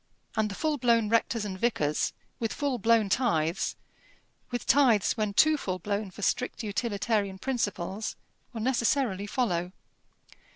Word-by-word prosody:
And 220 -1 +1
the 200 - -6
full 305 +2 -1
blown 230 -3 +3
rectors 230 -1 +1
and 190 -2 -5
vicars, 155 -11 +1 0.3
with 225 -2 -1
full 280 -4 -1
blown 225 0 +4
tithes 185 -7 +1 0.7
with 245 -2 -4
tithes 245 -8 +4
when 215 -3 -1
too 310 +4 +5
full 185 -9 -3
blown 205 +1 -3
for 200 +3 -9
strict 250 +2 -1
utilitarian 205 -2 -1
principles 210 -4 -2 0.4
will 230 -3 -5
necessarily 235 -4 +1
follow. 180 -7 -1
220 Hz, 135 wpm, -28 LUFS, 200-245 Hz, 0.7 s, too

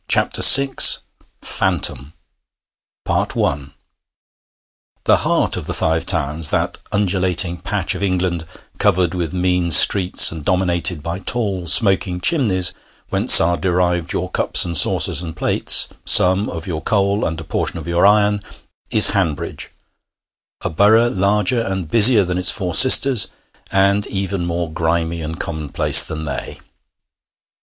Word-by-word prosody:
PHANTOM 135 0 +4 2.0
I 70 -2 -4 1.3
The - - +1
heart - - -2
of - - -9
the - - -5
Five 80 +1 -3
Towns 75 -2 0
that - - -4
undulating 95 -3 0
patch - - -4
of - - -9
England 90 -4 -4 0.3
covered 90 -4 -1
with 85 -4 -5
mean 90 -1 -3
streets, 90 +4 +5
and 80 -2 -10
dominated 90 -2 -1
by 85 +3 -7
tall 100 -7 -5
smoking 95 -2 +1
chimneys, 95 - 0 0.4
whence - - +7
are 85 +1 -1
derived 90 -2 -3
your 90 +1 -5
cups - - +1
and 85 -1 -7
saucers 75 +1 +2
and 80 -2 -9
plates, - - +2 0.2
some 95 +3 +4
of 80 +2 -9
your 80 -5 -7
coal, 100 +3 -2
and 80 0 -5
a - - -10
portion - - -5
of - - -11
your 85 0 -2
iron 105 0 0 0.5
is 110 - +6
Hanbridge, 90 -8 -5 0.9
a - - -6
borough 110 +7 +1
larger 100 +4 -1
and 95 -6 -6
busier 115 -1 +4
than 90 0 -5
its 90 0 +3
four 90 -4 -4
sisters, 130 +1 +5 0.4
and 100 +1 -1
even 95 -2 -6
more 85 -2 -6
grimy 85 0 -4
and 80 +1 -9
commonplace 75 -4 +3
than 80 0 -7
they. 70 - -8
90 Hz, 130 wpm, -16 LUFS, 85-100 Hz, 2.0 s, whence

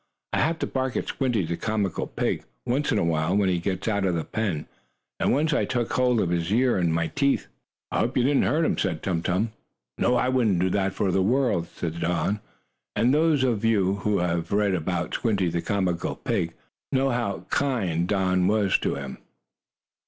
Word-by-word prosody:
"I - - +2
have 160 +3 +1
to - - -2
bark 130 -1 -2
at - - -2
Squinty, 120 -9 0
the 85 +1 -2
comical 105 -2 -1
pig, - - -2 0.2
once 140 +5 0
in 110 - +2
a 100 - +2
while, 85 +3 +1
when 100 -2 +3
he 90 -1 +1
gets 95 +2 -3
out 100 -3 +1
of 90 -2 +1
the 80 - -1
pen, 95 -8 -2 0.5
and - - +2
once 150 +3 +2
I - - +2
took 120 -2 -1
hold 125 -2 +3
of 90 -4 0
his 85 +1 -1
ear 120 -1 +3
in 85 -2 +2
my 80 0 +1
teeth." 140 - +1 0.5
"I - - 0
hope 125 +3 0
you 125 - +3
didn't 140 +2 +3
hurt 160 +3 +2
him," - - 0
said 85 -5 -1
Tum 85 -3 0
Tum. 95 +6 0 0.5
"No, 125 - +3
I 125 - +2
wouldn't 120 -7 +2
do 90 +1 +1
that 95 -1 0
for 95 - +1
the 95 +1 +2
world," 115 -5 +1
said 85 -1 -4
Don. 85 +5 0 0.6
And 120 +3 +3
those 155 -2 +3
of 115 -5 +1
you 100 -4 +2
who 105 0 0
have 85 -1 -1
read 100 -1 +2
about 90 0 -2
"Squinty, 100 -6 +1
the 85 0 -1
Comical 90 -1 -1
Pig," 85 0 -2 0.4
know 135 0 +2
how 120 -5 -2
kind 95 - 0
Don 95 -2 +2
was 105 -1 +2
to - - -1
him. 70 -1 -7
100 Hz, 205 wpm, -25 LUFS, 85-125 Hz, 0.6 s, when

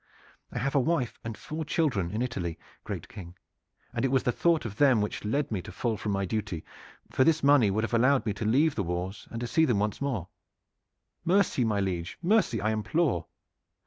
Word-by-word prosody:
I - - -5
have 140 +1 -1
a 140 - +4
wife 135 -3 0
and 115 -1 -5
four 160 +1 -5
children 140 - 0
in 110 +5 -1
Italy, 90 -10 -3 0.3
great - - -5
King; 90 -2 -10 0.6
and 120 - -2
it - - +4
was 135 0 +2
the 125 - +2
thought 165 +2 +2
of 105 -3 -5
them 135 -5 +5
which 105 0 -2
led 135 +7 -1
me 100 -4 -1
to - - -10
fall 115 -3 -1
from 105 0 -3
my 100 0 0
duty, 95 -5 -3 0.5
for 130 - +3
this 155 +1 +3
money 140 -7 +6
would 105 +3 0
have 120 - -3
allowed 125 +1 +3
me 105 - 0
to 105 - -5
leave 140 +8 +3
the 105 - -1
wars 90 +2 -4
and 115 - -5
to - - -1
see 160 +7 +2
them 120 -9 +3
once 105 +1 0
again. 125 -11 -1 1.0
Mercy, 185 -7 +2
my 105 -3 +1
liege, 90 -3 -2
mercy, 185 - +3
I 105 +2 0
implore!" 110 - 0
115 Hz, 210 wpm, -28 LUFS, 100-140 Hz, 1.0 s, money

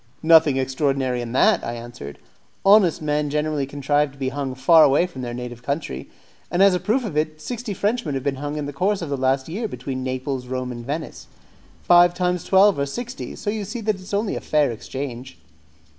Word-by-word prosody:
"Nothing 160 -4 +6
extraordinary 130 -1 0
in 120 -1 -6
that," 130 - +3
I 120 - -3
answered; 115 - -9 0.5
"honest 195 -6 +5
men 150 0 0
generally 150 -1 -1
contrive 145 +1 0
to - - -18
be 135 -1 -2
hung 135 -1 -4
far 160 +4 +6
away 145 +4 +4
from 155 -8 -8
their 120 -1 -4
native 120 -1 -7
country; 140 - -4 0.4
and 180 +2 +3
as 200 -1 +6
a 180 - +1
proof 235 +6 0
of 185 -8 -5
it, 155 0 -1
sixty 240 +5 -5
Frenchmen 205 - -1
have 135 - -3
been 140 -1 -1
hung 145 +2 -4
in 150 - -3
the 145 - -6
course 190 +5 0
of 150 - -5
last 135 0 0
year 210 +8 -3
between 135 -9 -5
Naples, 130 0 -3
Rome, 130 0 -3
and 120 -1 -7
Venice. 150 +6 -5 0.6
Five 175 0 +6
times 180 -1 0
twelve 195 -3 +4
are 140 - 0
sixty; 245 - -6
so 205 - -3
you 215 -1 -3
see 215 +5 -5
that 215 0 +1
it - - -13
is 185 - -11
only 205 +1 -1
a - - -4
fair 150 -4 +1
exchange." 130 +2 -7
145 Hz, 210 wpm, -22 LUFS, 130-180 Hz, 0.6 s, Nothing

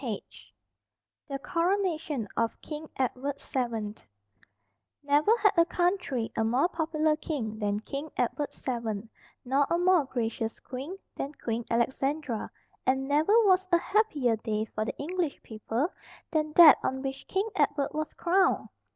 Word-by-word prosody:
=The 275 - -2
Coronation 330 - -1
of 230 0 -1
King 305 0 -7
Edward 265 +2 -2
VII= 230 -5 -2 1.1
Never 295 +11 +4
had 415 -3 +4
a 335 - +6
country 350 - 0
a 225 - +1
more 245 +8 +3
popular 315 -2 +1
king 235 -9 -4
than 205 0 -1
King 280 +7 -5
Edward 285 +4 -1
VII, 230 -4 -4 0.4
nor 275 +3 +2
a 340 - +2
more 355 -3 +4
gracious 225 -3 -3
queen 275 +9 -7 0.2
than 280 - -4
Queen 235 -4 -3
Alexandra, 265 +1 -1 0.3
and 265 +1 +1
never 300 +8 +3
was 375 -1 +4
a 345 - +6
happier 325 - +1
day 215 -1 -2
for 215 - -1
the - - -4
English 335 0 -2
people 225 - -2 0.4
than 305 -1 0
that 335 -2 +9
on 265 +1 -2
which 270 0 -5
King 390 +3 0
Edward 285 -2 +1
was 310 0 -2
crowned. 370 +2 +2
285 Hz, 140 wpm, -29 LUFS, 235-335 Hz, 1.1 s, that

